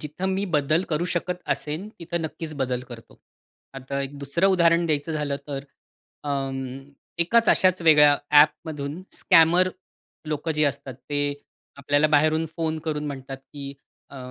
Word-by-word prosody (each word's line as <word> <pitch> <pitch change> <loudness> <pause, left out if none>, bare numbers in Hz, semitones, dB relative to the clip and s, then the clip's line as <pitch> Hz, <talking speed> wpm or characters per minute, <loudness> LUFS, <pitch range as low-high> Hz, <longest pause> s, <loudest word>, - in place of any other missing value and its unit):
जिथं 155 +5 -5
मी 195 - -1
बदल 155 +4 +2
करू 155 +3 0
शकत 180 +1 -2
असेन, 155 +7 -5
तिथं 170 0 -4
नक्कीच 155 +1 -5
बदल 125 -1 -2
करतो. 115 -1 -12 0.6
आता 135 +1 -4
एक 140 +1 -7
दुसरं 140 +7 +1
उदाहरण 170 0 +4
द्यायचं 155 +1 -1
झालं 145 -2 -2
तर 140 -1 -5 0.6
अं, 135 -2 -2 0.6
एकाच 225 +7 +3
अश्याच 185 -1 +3
वेगळ्या 150 -3 +6 0.2
ॲपमधून 150 +1 +1
स्कॅमर 175 +3 +5 0.6
लोकं 155 +2 -2
जे 150 0 +1
असतात 140 -2 -3 0.2
ते 145 0 0 0.6
आपल्याला 145 +2 +2
बाहेरून 155 +2 +3
फोन 160 -1 -1
करून 150 -1 -2
म्हणतात 135 -1 -6 0.2
की 140 -1 -7 0.4
अ, 140 - -11
150 Hz, 145 wpm, -24 LUFS, 140-165 Hz, 0.6 s, वेगळ्या